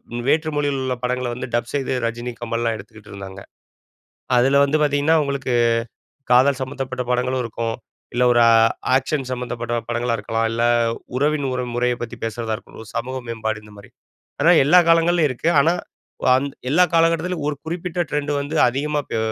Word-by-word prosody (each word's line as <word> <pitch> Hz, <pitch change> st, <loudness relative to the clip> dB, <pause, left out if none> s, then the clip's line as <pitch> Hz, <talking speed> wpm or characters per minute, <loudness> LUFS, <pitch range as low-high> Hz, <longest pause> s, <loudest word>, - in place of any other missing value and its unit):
ம் 120 Hz, -, -3 dB
வேற்று 155 Hz, +1 st, +2 dB
மொழியிலுள்ள 135 Hz, -3 st, -1 dB
படங்களை 125 Hz, 0 st, -1 dB
வந்து 130 Hz, +2 st, -5 dB
டப் 120 Hz, 0 st, -2 dB
செய்து, 135 Hz, -2 st, -1 dB
ரஜினி, 120 Hz, +2 st, -4 dB
கமல்லாம் 115 Hz, -1 st, -1 dB
எடுத்துக்கிட்டுருந்தாங்க. 100 Hz, -2 st, -11 dB, 1.0 s
அதுல 135 Hz, +3 st, +4 dB
வந்து 140 Hz, +2 st, +1 dB
பாத்தீங்கன்னா, 145 Hz, +2 st, +2 dB
உங்களுக்கு 135 Hz, -2 st, -2 dB, 0.8 s
காதல் 130 Hz, +2 st, +5 dB
சம்பந்தப்பட்ட 130 Hz, -1 st, -4 dB
படங்களும் 125 Hz, +1 st, 0 dB
இருக்கும். 115 Hz, 0 st, -3 dB, 0.4 s
இல்ல 125 Hz, +1 st, +2 dB
ஒரு 120 Hz, -, +4 dB
ஆ, -, -, +6 dB, 0.4 s
ஆக்க்ஷன் 135 Hz, +1 st, 0 dB
சம்மந்தப்பட்ட 120 Hz, -1 st, -3 dB
படங்களா 120 Hz, 0 st, -1 dB
இருக்கலாம். 115 Hz, +2 st, -1 dB
இல்ல, 115 Hz, +1 st, -2 dB, 0.6 s
உறவின் 145 Hz, +1 st, +1 dB
ஒரு 125 Hz, 0 st, -2 dB
முறைய 125 Hz, 0 st, +1 dB
பத்தி 120 Hz, -2 st, -5 dB
பேசுறதா 115 Hz, 0 st, -3 dB
இருக்கட்டும், 110 Hz, 0 st, -12 dB
"சமூக 130 Hz, +3 st, -3 dB
மேம்பாடு" 110 Hz, -1 st, -3 dB
இந்த 105 Hz, 0 st, -15 dB
மாரி. 100 Hz, 0 st, -14 dB, 0.5 s
ஆனா, 165 Hz, +4 st, +6 dB
எல்லா 175 Hz, +6 st, +7 dB
காலங்கள்லயும் 165 Hz, -1 st, +4 dB
இருக்கு. 130 Hz, +6 st, -1 dB
ஆனா, 160 Hz, +5 st, +4 dB, 0.5 s
வ -, -, +1 dB
அந் 140 Hz, -, -1 dB, 0.2 s
எல்லா 180 Hz, +5 st, +5 dB
காலகட்டத்திலும், 165 Hz, 0 st, +2 dB
ஒரு 145 Hz, -, -4 dB
குறிப்பிட்ட 175 Hz, +1 st, -3 dB
ட்ரெண்ட் 150 Hz, 0 st, -1 dB
வந்து 145 Hz, +3 st, -5 dB
அதிகமாக 145 Hz, +3 st, -2 dB
பே -, -, -1 dB
130 Hz, 160 wpm, -21 LUFS, 115-145 Hz, 1.0 s, எல்லா